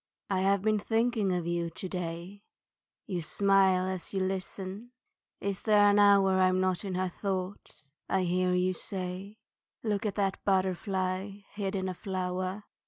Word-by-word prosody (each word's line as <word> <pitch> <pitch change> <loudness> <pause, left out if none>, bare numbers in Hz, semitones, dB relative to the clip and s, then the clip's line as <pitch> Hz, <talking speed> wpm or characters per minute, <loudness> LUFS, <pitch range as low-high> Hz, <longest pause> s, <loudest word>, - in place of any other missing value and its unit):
I 190 - +2
have 195 0 +2
been 215 -1 +2
thinking 225 -2 +1
of 175 -2 -1
you 170 0 -1
to 175 +3 -6
day, 180 +2 -5 0.6
You 180 -5 -3
smile 190 +1 +3
as 185 +1 -4
you - - +1
listen. 190 +4 -4 0.5
Is 200 -1 -3
there 210 -1 +5
an 205 - +4
hour 195 -2 +5
I'm 185 0 +4
not 185 0 0
in 190 -2 -3
her 185 0 0
thoughts, 185 -6 -5 0.2
I 190 -1 +2
hear 180 +1 +1
you 180 +1 +2
say 185 +3 -4 0.5
Look 210 -1 0
at 200 - -3
that 195 -2 -1
butterfly 190 +1 0
hid 200 -1 -3
in 190 -1 -1
a 185 - -2
flower. 185 +1 -3
190 Hz, 160 wpm, -30 LUFS, 185-200 Hz, 0.6 s, there